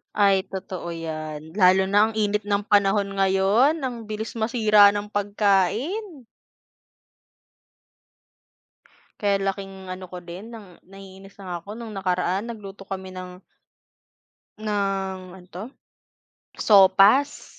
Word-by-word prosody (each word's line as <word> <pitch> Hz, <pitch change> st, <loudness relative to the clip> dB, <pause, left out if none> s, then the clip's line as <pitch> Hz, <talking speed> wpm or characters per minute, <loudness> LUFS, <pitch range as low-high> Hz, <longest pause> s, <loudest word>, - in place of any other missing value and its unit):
Ay, 195 Hz, -2 st, +3 dB
totoo 185 Hz, -2 st, -6 dB
yan. 155 Hz, -1 st, -6 dB
Lalo 185 Hz, 0 st, +5 dB
na 205 Hz, +2 st, +4 dB
ang 225 Hz, -, -6 dB
init 210 Hz, -1 st, 0 dB
ng 205 Hz, 0 st, 0 dB
panahon 200 Hz, 0 st, +3 dB
ngayon, 195 Hz, +9 st, +3 dB
ang 235 Hz, -4 st, -5 dB
bilis 215 Hz, +1 st, -5 dB
masira 215 Hz, -2 st, +5 dB
ng 205 Hz, 0 st, -4 dB
pagkain. 215 Hz, -, 0 dB, 2.9 s
Kaya 200 Hz, -1 st, +1 dB
laking 195 Hz, 0 st, -4 dB, 0.2 s
ano 185 Hz, 0 st, -9 dB
ko 180 Hz, -, -7 dB
din 190 Hz, +7 st, -9 dB
ng 225 Hz, -3 st, -10 dB, 0.3 s
naiinis 195 Hz, 0 st, -14 dB
na -, -, -10 dB
nga 175 Hz, -1 st, -3 dB
ako 200 Hz, -, -10 dB
nung 225 Hz, -3 st, -8 dB
nakaraan 190 Hz, +3 st, -1 dB
nagluto 200 Hz, -3 st, -10 dB
kami 190 Hz, -1 st, -7 dB
ng 180 Hz, 0 st, -9 dB, 1.2 s
ng 195 Hz, -3 st, -2 dB, 0.2 s
ano 180 Hz, -1 st, -15 dB
'to, 180 Hz, +3 st, -7 dB, 0.9 s
sopas. 200 Hz, +7 st, +4 dB
200 Hz, 115 wpm, -23 LUFS, 190-215 Hz, 2.9 s, Lalo